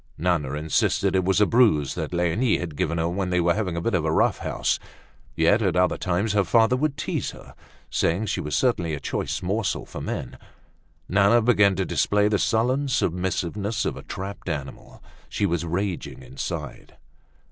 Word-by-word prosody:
Nana 80 -5 0
insisted 75 +5 +1
it 95 - +2
was 95 +2 +2
a 105 - +6
bruise 100 - +3
that - - -4
Leonie 90 +7 +1
had 80 -4 -5
given 85 +4 -1
her 80 0 0
when 90 +2 -2
they 90 0 +1
were 85 0 +3
having 95 -4 -2
a - - -1
bit 115 - -1
of 85 -4 +1
a 80 - 0
rough - - +2
house. - - -1 0.6
Yet 85 +8 +3
at 95 -4 +1
other 90 0 +3
times 95 +4 0
her 100 -1 +3
father 115 +6 +3
would 140 +2 -1
tease - - -2
her, - - -12 0.4
saying 90 +7 +1
she 100 - -2
was 75 - -3
certainly 85 -11 +1
a - - -7
choice - - -3
morsel 100 +2 -1
for - - -8
men. - - -5 0.7
Nana 100 +5 +4
began 105 -4 +4
to 95 +1 -1
display 105 +4 +2
the 105 -1 +1
sullen 125 +6 +1
submissiveness 100 0 -1
of - - -1
a - - -8
trapped 95 -1 -7
animal. 70 -4 -6 0.3
She 105 - 0
was 85 -3 -1
raging 90 +2 -3
inside. 65 - -6
95 Hz, 185 wpm, -24 LUFS, 85-105 Hz, 0.7 s, a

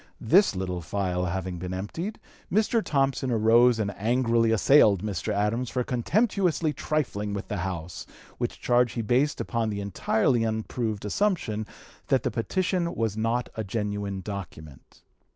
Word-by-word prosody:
This 180 - +4
little 90 -1 -3
phial 90 +1 -2
having 90 0 -3
been 90 +1 -4
emptied, 165 - -5 0.3
Mr. 215 +3 +2
Thompson 135 -2 0
arose 115 +1 +5
and 100 -2 -2
angrily 115 +1 +2
assailed 110 -3 +5
Mr. 100 -6 -2
Adams 105 +4 0
for 125 - -1
contemptuously 170 - +1
trifling 110 -9 -2
with 100 - -6
the 105 - -2
House, 85 -2 -5 0.3
which - - -3
charge 120 -1 +2
he 115 - -2
based 130 +7 +1
upon 115 -2 -1
the 100 -1 -3
entirely 110 +5 +1
unproved 110 -1 -2
assumption 110 - -1 0.4
that - - +2
the - - 0
petition 180 +6 -1
was 110 -3 -1
not 115 +3 -1
a 110 - -3
genuine 100 -1 -3
document. 85 -8 -9
110 Hz, 145 wpm, -26 LUFS, 100-130 Hz, 0.4 s, arose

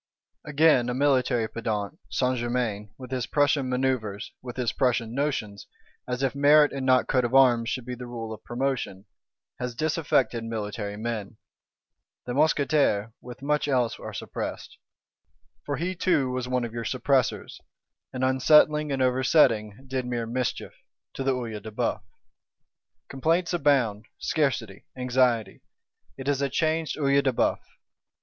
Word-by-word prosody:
Again, 150 -5 +3
a 125 - -2
military 130 -4 +2
pedant, 110 - -4
Saint 125 -1 0
Germain, 120 -4 -2
with 130 -1 -10
his 125 -2 -2
Prussian 145 -2 +2
manœuvres; 125 -5 -1
with 125 -1 -8
his 125 -3 -1
Prussian 120 -3 0
notions, 125 -8 -2 0.4
as 125 +1 -2
if 135 - +1
merit 145 +1 +5
and 135 -1 -3
not 130 0 +4
coat 130 -1 +2
of 120 +2 -1
arms 120 -4 +5
should 130 -2 -3
be 125 - -5
the 125 0 -7
rule 115 -2 -6
of 110 - -11
promotion, 120 -6 -3 0.5
has 125 -1 -4
disaffected 150 -5 0
military 105 -2 -4
men; 110 -2 -4 0.9
the 125 - -4
Mousquetaires, 140 -7 +2
with 125 +2 -11
much 150 +1 0
else 125 -5 0
are - - -7
suppressed: - - -6 0.9
for 145 - -1
he 180 +3 -2
too 165 -8 +1
was 125 0 -3
one 125 -1 0
of 115 - -8
your 115 0 -4
suppressors; 130 +1 0 0.5
and 130 0 -4
unsettling 150 +3 +4
and 135 -1 +1
oversetting, 125 -4 +2
did 130 -1 -3
mere 120 -2 -2
mischief—to 125 +2 -5
the 135 -1 +1
Œil 115 -4 -5
de 110 - -8
Bœuf. 105 - -2 1.1
Complaints 165 +6 0
abound; 130 -10 +1
scarcity, 120 -10 -1
anxiety: 125 -5 +1 0.6
it 135 0 -7
is 140 -1 +1
a 140 - +1
changed 160 +2 0
Œil 140 -2 +3
de 135 - +2
Bœuf. 120 - +1
125 Hz, 145 wpm, -26 LUFS, 115-140 Hz, 1.1 s, merit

